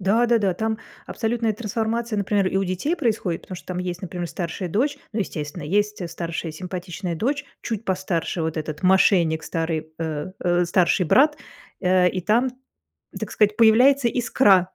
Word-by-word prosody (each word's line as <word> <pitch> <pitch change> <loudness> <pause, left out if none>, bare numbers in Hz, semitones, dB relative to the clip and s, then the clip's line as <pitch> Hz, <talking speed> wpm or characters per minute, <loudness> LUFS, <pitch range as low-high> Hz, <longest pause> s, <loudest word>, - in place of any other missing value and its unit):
Да 215 +6 +3
да-да, 215 -6 +2
там 220 +3 -1 0.3
абсолютная 230 0 -1
трансформация, 225 +1 -2
например, 200 -1 +1
и 190 - -2
у 195 - +2
детей 190 - -1
происходит, 215 - -1
потому 185 - -8
что - - -12
там 180 -1 -3
есть, 180 0 -4
например, 175 -1 -4
старшая 175 +2 -4
дочь. 280 - 0
Ну, 220 - -1
естественно, 155 -3 -4
есть 205 +3 0
старшая 165 -1 -4
симпатичная 180 +1 -5
дочь, 280 - -1 0.2
чуть 225 -1 -4
постарше. 185 -3 -1
Вот 160 0 -2
этот 155 +1 -4
мошенник 180 -4 +4
старый, 160 -2 -2
э, 160 +1 -3
э, 175 0 +2
старший 175 0 +2
брат, 295 - +4 0.4
э, 180 -1 +4
и 185 - -3
там, 225 +8 +2 0.7
так - - -5
сказать, 210 -1 +2
появляется 240 +4 +6
искра 215 -6 +3
190 Hz, 165 wpm, -23 LUFS, 175-225 Hz, 0.7 s, появляется